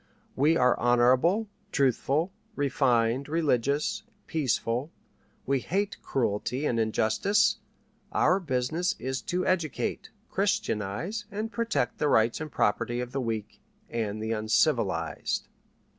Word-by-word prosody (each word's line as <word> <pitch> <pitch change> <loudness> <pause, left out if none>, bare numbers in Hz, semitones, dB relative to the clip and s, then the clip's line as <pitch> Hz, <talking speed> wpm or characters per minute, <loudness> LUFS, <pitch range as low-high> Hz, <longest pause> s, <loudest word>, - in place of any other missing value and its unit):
We 155 +5 +3
are 125 0 +4
honorable, 125 - +3 0.2
truthful, 140 +5 +1 0.2
refined, 130 -2 +1
religious, 145 -3 +1 0.2
peaceful; 130 -3 -1 0.6
we 135 0 +1
hate 195 +9 -2
cruelty 125 +3 -1
and 115 -5 +1
injustice; 110 - +2 0.5
our 185 - +3
business 155 +2 -1
is 130 0 -3
to 180 +1 -2
educate, 170 -6 -1 0.2
Christianize, 110 - -1
and 220 +1 -4
protect 230 - -1
the 150 - +2
rights 115 +4 +3
and 155 -2 -5
property 110 +4 0
of 125 0 -4
the 135 - -2
weak 110 -3 -4 0.3
and 110 -2 -2
the 110 - -2
uncivilized." 110 - 0
130 Hz, 115 wpm, -28 LUFS, 115-160 Hz, 0.6 s, are